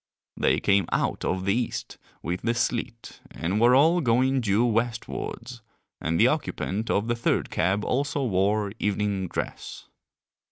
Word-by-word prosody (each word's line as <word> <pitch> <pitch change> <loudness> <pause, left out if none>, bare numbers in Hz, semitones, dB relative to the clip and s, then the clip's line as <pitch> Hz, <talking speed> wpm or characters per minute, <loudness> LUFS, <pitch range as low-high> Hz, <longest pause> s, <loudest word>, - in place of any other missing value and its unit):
They - - +2
came 100 -3 +2
out - - -1
of 95 0 -1
the 100 - +2
East 120 0 -3 0.2
with 90 +3 -3
the 115 0 0
sleet 115 -1 -3
and 95 +6 -2
were 120 +2 +6
all 165 +6 +4
going 130 +1 +2
due 110 +1 +2
westwards, 115 +1 -3 0.4
and 80 +1 -1
the - - +6
occupant 105 +4 -2
of 105 +3 +1
the 120 - +1
third 115 - 0
cab 100 +3 0
also 140 +1 -1
wore 100 0 +1
evening 100 -2 -1
dress. - - -6
115 Hz, 150 wpm, -26 LUFS, 100-120 Hz, 0.4 s, were